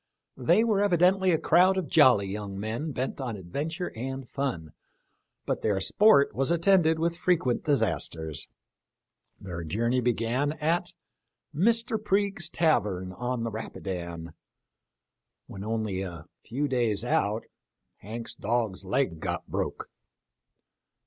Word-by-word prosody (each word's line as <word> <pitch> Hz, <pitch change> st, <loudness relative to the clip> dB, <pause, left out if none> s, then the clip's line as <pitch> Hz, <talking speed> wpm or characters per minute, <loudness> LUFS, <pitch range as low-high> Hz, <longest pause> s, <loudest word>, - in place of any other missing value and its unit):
They 170 Hz, -, +3 dB
were 215 Hz, -4 st, +2 dB
evidently 190 Hz, 0 st, +3 dB
a 165 Hz, -, +3 dB
crowd 180 Hz, +5 st, +4 dB
of 185 Hz, -5 st, -1 dB
jolly 125 Hz, -6 st, +5 dB
young 100 Hz, 0 st, -5 dB
men 115 Hz, +9 st, -3 dB
bent 130 Hz, +1 st, -3 dB
on 120 Hz, -4 st, -3 dB
adventure 150 Hz, -, -4 dB
and 130 Hz, +2 st, -5 dB
fun, 120 Hz, -, -3 dB, 0.7 s
but -, -, -2 dB
their 105 Hz, -3 st, +1 dB
sport 200 Hz, -, +4 dB
was 135 Hz, +1 st, 0 dB
attended 170 Hz, -1 st, +4 dB
with 165 Hz, +1 st, 0 dB
frequent 170 Hz, -9 st, +1 dB
disasters. 80 Hz, -, 0 dB, 0.9 s
Their 85 Hz, -3 st, -6 dB
journey 115 Hz, +10 st, 0 dB
began 120 Hz, +4 st, 0 dB
at 165 Hz, +3 st, -1 dB, 0.3 s
" -, -, -56 dB
Mr. 225 Hz, -, +1 dB
Priges' 195 Hz, -4 st, 0 dB
tavern 100 Hz, -, +1 dB
on 125 Hz, +3 st, -3 dB
the 115 Hz, -, -2 dB
Rapidan." 85 Hz, -6 st, -6 dB, 1.1 s
When 95 Hz, -, -8 dB
only 110 Hz, -3 st, -2 dB
a 85 Hz, -4 st, -7 dB, 0.2 s
few 140 Hz, +6 st, -2 dB
days 120 Hz, -5 st, 0 dB
out 110 Hz, -2 st, +1 dB, 0.3 s
" -, -, -54 dB
Hanks' 115 Hz, +2 st, -7 dB
Dog's 110 Hz, -3 st, -1 dB
leg 95 Hz, -3 st, 0 dB
got -, -, -3 dB
broke." -, -, -3 dB
125 Hz, 130 wpm, -27 LUFS, 100-165 Hz, 1.1 s, jolly